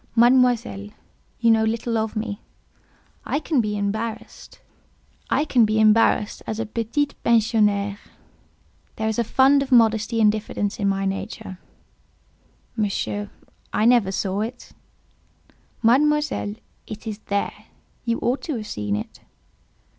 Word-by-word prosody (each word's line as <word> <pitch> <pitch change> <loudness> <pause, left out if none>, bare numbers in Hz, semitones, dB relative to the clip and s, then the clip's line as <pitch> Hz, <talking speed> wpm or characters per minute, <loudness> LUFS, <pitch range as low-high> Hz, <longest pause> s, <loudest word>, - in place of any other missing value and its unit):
"Mademoiselle, 240 - +3 0.5
you 230 -1 +4
know 220 0 +4
little 230 +1 -1
of 220 0 -1
me; 215 -1 -4 0.8
I - - -1
can 310 -5 +1
be 210 -1 -2
embarrassed 220 +3 -5 0.7
as 220 -4 +2
a 225 - -1
petite 230 +7 -2
pensionnaire; 210 -3 +2 1.0
there 220 - -2
is 220 +1 -1
a - - +3
fund 270 +5 +4
of 275 -1 -4
modesty 225 -1 +3
and 210 -1 +5
diffidence 210 -1 -3
in 200 -1 +1
my 195 0 -1
nature—" 190 -1 -5 1.2
"Monsieur, 205 -1 -2 0.4
I 215 - +1
never 235 -5 +4
saw 195 +1 -2
it." 240 +3 -6 1.1
"Mademoiselle, 290 -2 +2 0.3
it 215 +1 -8
is 215 -2 -5
there. 200 0 -2 0.4
You 235 -1 0
ought 250 +3 0
to 305 - -2
have 220 -2 -5
seen 105 - -3
it." 105 - -6
220 Hz, 120 wpm, -23 LUFS, 205-235 Hz, 1.2 s, and